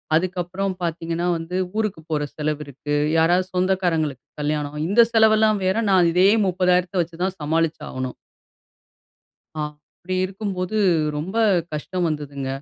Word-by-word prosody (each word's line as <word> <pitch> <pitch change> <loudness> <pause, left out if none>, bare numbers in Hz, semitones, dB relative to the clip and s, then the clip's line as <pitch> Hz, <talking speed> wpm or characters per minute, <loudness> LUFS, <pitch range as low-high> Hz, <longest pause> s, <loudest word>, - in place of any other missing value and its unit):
அதுக்கப்புறம் 185 +2 -1
பார்த்தீங்கன்னா 165 +1 -2
வந்து, 165 +2 -6 0.2
ஊருக்கு 215 -7 -1
போற 150 -1 0
செலவு 150 0 -2
இருக்கு. 140 +2 -5 0.2
யாராவது 175 +3 +3
சொந்தக்காரங்களுக்கு 175 -7 0 0.2
கல்யாணம், 150 0 -2
இந்த 205 +5 +5
செலவெல்லாம் 220 -1 +4
வேற 190 +4 +1
நான் 180 -3 +5
இதே 185 +3 +5 0.2
30,000த்தை 180 0 +1
வச்சு 170 0 -6
தான் 190 0 -1
சமாளிச்சு 160 +2 0
ஆகணும்." 130 -1 -4 1.4
ஆ - - 0 0.4
அப்டி 185 +1 -2
இருக்கும்போது 195 0 -3 0.4
ரொம்ப 170 +8 -4 0.4
கஷ்டம் 170 +4 -2
வந்ததுங்க. 145 -3 -4
175 Hz, 125 wpm, -22 LUFS, 155-185 Hz, 1.4 s, இந்த